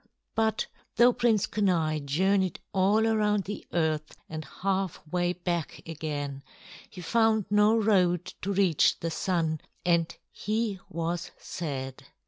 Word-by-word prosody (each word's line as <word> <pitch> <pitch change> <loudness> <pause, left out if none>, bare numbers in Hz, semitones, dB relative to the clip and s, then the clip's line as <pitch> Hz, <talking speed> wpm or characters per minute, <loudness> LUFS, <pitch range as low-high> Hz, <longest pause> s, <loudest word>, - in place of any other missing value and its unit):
But 220 0 +1 0.3
though 240 +1 +6
Prince 235 -4 +2
Kenai 170 -7 +1
journeyed 185 +6 +1
all 200 +4 +3
around 210 -2 +2
the 205 +2 -7
earth 155 -2 -1
and 155 0 -5
halfway 180 -2 -1
back 175 -3 -3
again, 145 -3 -4 0.5
he 180 - -10
found 220 +2 +2
no 210 +2 +5
road 180 -5 +3 0.2
to 200 - -2
reach 190 -5 +3
the 165 - -2
Sun, 160 -3 0 0.2
and 170 -2 +2 0.2
he 215 -1 -2
was 170 0 -3
sad. 135 -6 -5
180 Hz, 120 wpm, -28 LUFS, 160-210 Hz, 0.5 s, though